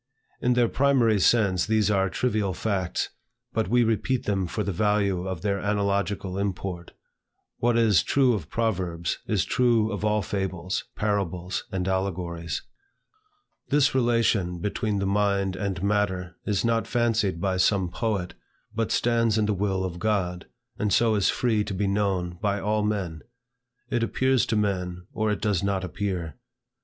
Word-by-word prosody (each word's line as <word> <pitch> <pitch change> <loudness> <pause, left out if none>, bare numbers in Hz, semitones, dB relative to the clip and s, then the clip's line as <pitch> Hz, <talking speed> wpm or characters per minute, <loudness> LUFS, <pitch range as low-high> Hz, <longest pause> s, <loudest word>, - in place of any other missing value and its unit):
In 125 - +3
their 120 -1 +3
primary 125 -5 +3
sense 100 -4 +3
these 110 -2 +2
are 95 -1 +2
trivial 105 -5 0
facts, 95 -4 -1 0.4
but 110 - 0
we 120 +4 +3
repeat 115 +3 0
them 95 -3 0
for 105 +5 -2
the 100 - -2
value 100 -1 +1
of 95 -3 -4
their 100 -1 0
analogical 100 -1 -1
import. 95 -3 -4 0.7
What 120 0 +2
is 110 -8 +4
true 130 - +3
of 90 -8 -4
proverbs, 90 -7 -1
is - - +1
true 115 -3 +2
of 105 0 -4
all 105 -1 +2
fables, 95 -1 -3
parables, 95 -4 -2
and 95 -1 -2
allegories. 90 -3 -2 1.1
This 145 0 +3
relation 115 -8 +2
between 105 +3 -1
the 100 - -1
mind 100 -1 +1
and 95 -2 -3
matter 95 -3 0
is 105 +1 +1
not 115 -1 +1
fancied 110 -7 +1
by 95 +1 0
some 95 0 +2
poet, 105 -6 -2 0.4
but 115 -1 -1
stands 115 -2 +2
in 110 - +2
the 105 - +1
will 95 -1 -1
of 90 -1 -5
God, 90 -4 -1 0.3
and 105 -1 0
so 115 +1 +4
is 100 -3 +2
free 110 -4 +1
to 100 - -4
be 100 +2 0
known 95 -3 -1
by 100 -1 0
all 105 +2 0
men. 95 -6 -2 0.7
It 120 -2 +1
appears 130 +2 +2
to 110 - 0
men, 90 -4 -1
or 110 0 0
it 105 - -1
does 100 -5 +1
not 100 -1 -1
appear. 90 -3 -3
100 Hz, 160 wpm, -26 LUFS, 95-110 Hz, 1.1 s, is